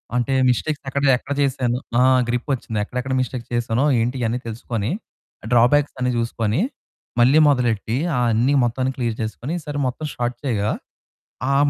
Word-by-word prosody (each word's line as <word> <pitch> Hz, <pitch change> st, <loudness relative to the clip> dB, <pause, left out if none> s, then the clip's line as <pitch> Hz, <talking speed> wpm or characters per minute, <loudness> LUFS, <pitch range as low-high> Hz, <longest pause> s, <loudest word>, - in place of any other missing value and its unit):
అంటే, 125 Hz, +2 st, +1 dB, 0.2 s
మిస్టేక్స్ 145 Hz, +4 st, -1 dB
ఎక్కడ 140 Hz, +1 st, -1 dB
చె -, -, +7 dB
ఎక్కడ 140 Hz, -, -5 dB
చేసాను. 130 Hz, -3 st, +1 dB, 0.2 s
ఆ! -, -, +5 dB, 0.3 s
గ్రిప్ 125 Hz, +4 st, -2 dB
వచ్చింది. 115 Hz, -3 st, -4 dB
ఎక్కడెక్కడ 125 Hz, +4 st, -3 dB
మిస్టేక్స్ 125 Hz, -1 st, -3 dB
చేసానో, 120 Hz, +2 st, +1 dB, 0.2 s
ఏంటి 120 Hz, +3 st, 0 dB
ఇవన్నీ 120 Hz, +2 st, 0 dB
తెలుసుకొని 115 Hz, -1 st, -3 dB, 0.6 s
డ్రాబ్యాక్స్ 125 Hz, +5 st, +4 dB
అన్ని 125 Hz, 0 st, +1 dB
చూసుకొని 115 Hz, -, 0 dB, 0.6 s
మళ్ళీ 130 Hz, +6 st, +6 dB
మొదలెట్టి 120 Hz, -4 st, +1 dB, 0.2 s
ఆ -, -, +2 dB
అన్ని, 120 Hz, +6 st, +2 dB
మొత్తాన్ని 130 Hz, +2 st, 0 dB
క్లియర్ 120 Hz, -3 st, -1 dB
చేసుకొని, 120 Hz, +7 st, -4 dB
ఈసారి 145 Hz, -2 st, -5 dB
మొత్తం 150 Hz, +5 st, -4 dB
స్టార్ట్ 120 Hz, 0 st, -2 dB
చేయగా. 110 Hz, -4 st, 0 dB, 0.8 s
ఆ -, -, +3 dB
125 Hz, 155 wpm, -22 LUFS, 115-135 Hz, 0.8 s, చె